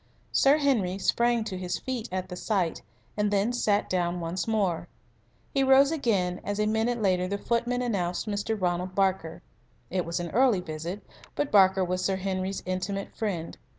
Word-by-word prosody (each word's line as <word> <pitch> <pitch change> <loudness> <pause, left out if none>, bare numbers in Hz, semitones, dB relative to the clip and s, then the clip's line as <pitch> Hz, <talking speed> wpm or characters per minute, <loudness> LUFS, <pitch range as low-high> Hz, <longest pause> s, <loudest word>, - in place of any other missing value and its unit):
Sir 275 +2 +5
Henry 230 -11 +1
sprang 235 +3 +2
to 195 -4 -5
his 180 -1 -2
feet 250 -3 -4
at 185 0 -3
the 180 - -5
sight, 180 -3 -1 0.3
and 210 0 +1
then 205 +4 +1
sat 210 -4 +1
down 175 -1 0
once 170 +3 -3
more. 200 -7 0 0.7
He 275 - +2
rose 270 +2 +6
again 200 - 0
as 205 0 -3
a 210 - +2
minute 220 +3 +1
later 185 -3 +1
the 200 +2 -2
footman 240 +3 0
announced 180 -7 -1
Mr. 210 +1 -2
Ronald 180 0 -1
Barker. 190 -4 0 0.5
It 180 0 0
was 170 +1 -3
an 170 -2 -4
early 245 -3 +4
visit, 170 +3 -6 0.3
but 290 -1 -1
Barker 190 -2 +5
was 185 +1 -2
Sir 190 +1 +1
Henry's 190 0 -3
intimate 185 +2 -3
friend. 185 -7 -3
195 Hz, 175 wpm, -27 LUFS, 180-225 Hz, 0.7 s, rose